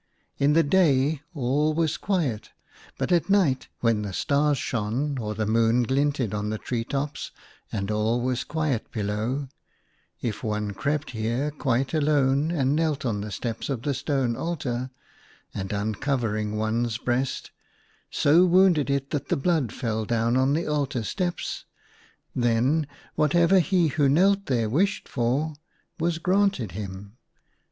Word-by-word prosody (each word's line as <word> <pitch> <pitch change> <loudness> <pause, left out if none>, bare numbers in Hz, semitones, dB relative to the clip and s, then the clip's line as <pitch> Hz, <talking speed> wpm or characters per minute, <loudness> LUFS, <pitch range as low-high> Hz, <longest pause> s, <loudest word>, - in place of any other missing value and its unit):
In 145 +1 +4
the 165 +1 +5
day 145 -3 +3
all 145 +3 +1
was 165 -1 +1
quiet, 150 - -1 0.5
but - - -2
at 175 +1 +2
night, 180 -10 +2
when 115 -3 +2
the 100 -2 -5
stars 145 +6 +2
shone 125 +6 -2
or 105 -2 -3
the 110 - -1
moon 115 +2 +3
glinted 135 -3 0
on 105 0 -2
the 110 - -2
tree 115 +1 -3
tops, 140 +3 -3 0.4
and 100 0 -2
all 110 +3 +1
was 125 +1 -1
quiet 150 -5 -2
below, 110 +6 -2 0.7
if 115 -1 -4
one 105 -2 -2
crept 145 +9 -2
here 120 +6 -1
quite 135 -2 -1
alone 145 -1 +2
and 140 -4 +1
knelt 155 -3 0
on 105 -4 -1
the 105 - -5
steps 115 +5 -4
of 130 -4 -3
the 145 -1 0
stone 135 -3 0
altar, 130 -7 -3 0.6
and 95 0 -4
uncovering 110 0 -1
one's 110 +1 0
breast, 125 +2 -2 0.6
so 160 +5 +4
wounded 180 -5 +4
it 140 0 -1
that 145 - -2
the - - +2
blood 145 -5 +1
fell 110 -2 -2
down 115 +1 +1
on 130 +2 +3
the 165 +3 0
altar 140 -5 -1
steps, 175 - -3 0.7
then 125 +6 +2 0.3
whatever 170 +5 +4
he 180 -2 +2
who 140 0 +2
knelt 195 +6 +3
there 120 -4 +1
wished 180 - 0
for 135 +6 0 0.5
was 165 0 0
granted 185 - +1
him. 100 +3 -7
135 Hz, 145 wpm, -25 LUFS, 115-150 Hz, 0.7 s, the